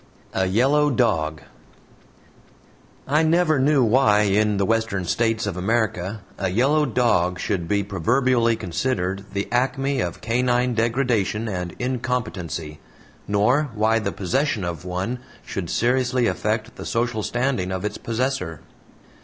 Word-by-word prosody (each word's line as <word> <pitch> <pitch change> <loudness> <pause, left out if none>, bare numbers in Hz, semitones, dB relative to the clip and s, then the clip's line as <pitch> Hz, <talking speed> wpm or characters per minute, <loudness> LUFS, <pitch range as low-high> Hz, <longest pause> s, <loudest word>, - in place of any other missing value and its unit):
A 95 0 +1
YELLOW 135 +9 +3
DOG 80 - 0 1.6
I 150 +3 +3
never 160 -2 +3
knew 140 0 +4
why 110 -3 +4
in 105 0 +2
the 100 - +1
Western 115 -3 0
States 115 +4 0
of 105 -4 -3
America 100 0 -1 0.2
a 95 - 0
yellow 140 +10 +2
dog 90 -8 +1
should 90 -5 -2
be 100 +3 +1
proverbially 115 +5 +2
considered 95 0 -2
the 100 0 -2
acme 135 +2 0
of - - -3
canine 125 +1 +1
degradation 115 -2 0
and 90 -4 -4
incompetency, 115 -11 -3 0.5
nor 125 +9 +2
why 110 +1 +2
the 110 - -2
possession 125 - -1
of 85 -1 -4
one 95 +8 -3 0.3
should 90 -4 -4
seriously 125 0 +1
affect 110 +2 -1
the - - -7
social 115 -2 -1
standing 120 -5 -1
of 95 +2 -3
its 105 - -3
possessor. 115 - -2
115 Hz, 130 wpm, -23 LUFS, 95-125 Hz, 1.6 s, knew